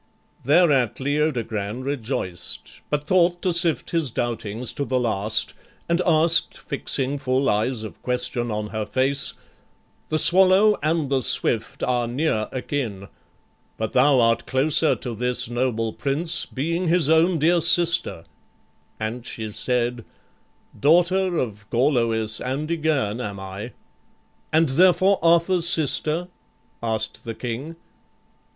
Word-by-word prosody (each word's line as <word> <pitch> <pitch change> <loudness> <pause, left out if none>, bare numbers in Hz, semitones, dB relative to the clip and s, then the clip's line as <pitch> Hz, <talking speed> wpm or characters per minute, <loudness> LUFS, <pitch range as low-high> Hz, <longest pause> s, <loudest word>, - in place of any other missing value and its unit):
Thereat 140 -5 +3
Leodogran 125 -6 -2
rejoiced, 115 -10 -5
but 145 -1 -1
thought 175 +2 +2
To 185 -2 +1
sift 170 -1 0
his 165 -5 0
doubtings 115 -1 -3
to 140 - -3
the 130 -2 0
last, 110 -3 0 0.3
and 170 +1 +1
ask'd, 165 0 +3
Fixing 140 -1 -2
full 130 0 0
eyes 110 +3 0
of 110 - -9
question 125 -1 -2
on 105 -1 -3
her 110 0 -3
face, 135 +4 0 0.8
"The 155 - 0
swallow 190 +5 +5
and 155 -2 0
the 135 -1 +2
swift 115 -2 0
are 120 -2 0
near 120 -3 -1
akin, 120 -7 -4 0.7
But 110 -1 -3
thou 135 +1 +4
art 115 -1 +2
closer 145 +3 +2
to 120 - -6
this 125 +1 -1
noble 120 -2 -1
prince, 160 +4 -1
Being 165 +6 -2
his 170 -2 +3
own 160 +3 +3
dear 170 +3 +3
sister"; 170 - +2 0.8
and 110 +3 -4
she 110 -2 -5
said, 120 +1 -1 0.8
"Daughter 175 +4 +3
of 105 -6 -4
Gorloïs 115 -4 0
and 135 +4 -3
Ygerne 145 -9 -1
am 100 -4 -5
I"; 95 +5 -7 0.8
"And 160 +1 +3
therefore 185 +6 +4
Arthur's 170 +1 +3
sister?" 160 +2 +1 0.5
asked 110 -1 -3
the 115 -1 -6
King. 130 +7 -5
130 Hz, 125 wpm, -23 LUFS, 115-160 Hz, 0.8 s, swallow